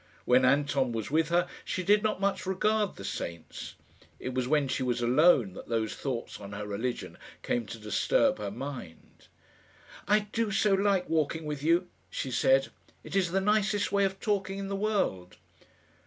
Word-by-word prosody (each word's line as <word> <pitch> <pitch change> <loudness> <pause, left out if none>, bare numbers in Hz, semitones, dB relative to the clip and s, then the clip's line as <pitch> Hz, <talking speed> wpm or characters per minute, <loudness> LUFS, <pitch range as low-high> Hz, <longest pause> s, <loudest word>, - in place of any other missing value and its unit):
When 125 +1 +5
Anton 140 -2 +2
was 110 +2 -4
with 160 +1 +2
her 175 +1 +2 0.2
she 185 - -3
did 205 +3 +4
not 215 -3 0
much 200 -1 -1
regard 210 +2 +1
the 100 - -9
saints. 85 -4 -6 0.4
It 130 - -4
was 130 -1 -1
when 145 0 +2
she 130 - -2
was 125 -1 0
alone 125 - +4
that - - -10
those 110 -2 -1
thoughts 130 -4 -4
on 100 0 -9
her 105 +1 -5
religion 110 +5 -4 0.2
came 120 -3 -1
to 115 - -7
disturb 105 0 +1
her 105 -1 -3
mind. 120 - -9 0.8
"I 210 +1 +4
do 230 -2 0
so 210 -1 +2
like 195 -2 +2
walking 160 0 0
with 150 -2 -4
you," 170 +4 +2 0.2
she - - -4
said. - - +3 0.3
"It - - -7
is 190 -3 +2
the 190 +3 +1
nicest 210 0 +1
way 200 0 +3
of 195 0 -3
talking 195 -2 -1
in 195 0 -4
the 200 - -2
world." 195 - -1
160 Hz, 180 wpm, -29 LUFS, 120-195 Hz, 0.8 s, When